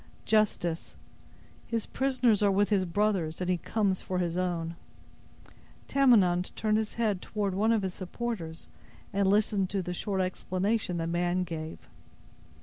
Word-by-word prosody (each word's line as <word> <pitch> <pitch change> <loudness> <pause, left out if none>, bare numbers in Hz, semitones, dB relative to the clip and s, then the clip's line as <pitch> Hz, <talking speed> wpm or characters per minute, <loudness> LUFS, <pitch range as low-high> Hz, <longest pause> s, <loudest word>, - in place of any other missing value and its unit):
"Justice. 195 -6 +1 0.7
His 230 -2 -1
prisoners 255 -5 +2
are 205 - +4
with 200 +1 +2
his 195 -3 +2
brothers, 185 -3 0
and 180 - -2
he 180 -1 +2
comes 195 +1 0
for 185 - -3
his 175 -2 -1
own." 170 -2 -1 1.1
Tamenund 200 -10 +4
turned 215 0 +1
his 220 -1 -4
head 215 -5 0
toward 205 -3 -2
one 215 +4 +2
of 220 -3 +2
his 190 -1 -2
supporters, 185 -4 -5 0.5
and 195 0 +2
listened 200 -2 +2
to 195 -1 -1
the 180 - -4
short 195 +2 -2
explanation 185 +1 -1
the 165 - -1
man 175 +2 0
gave. 160 -2 -5
190 Hz, 145 wpm, -29 LUFS, 180-215 Hz, 1.1 s, are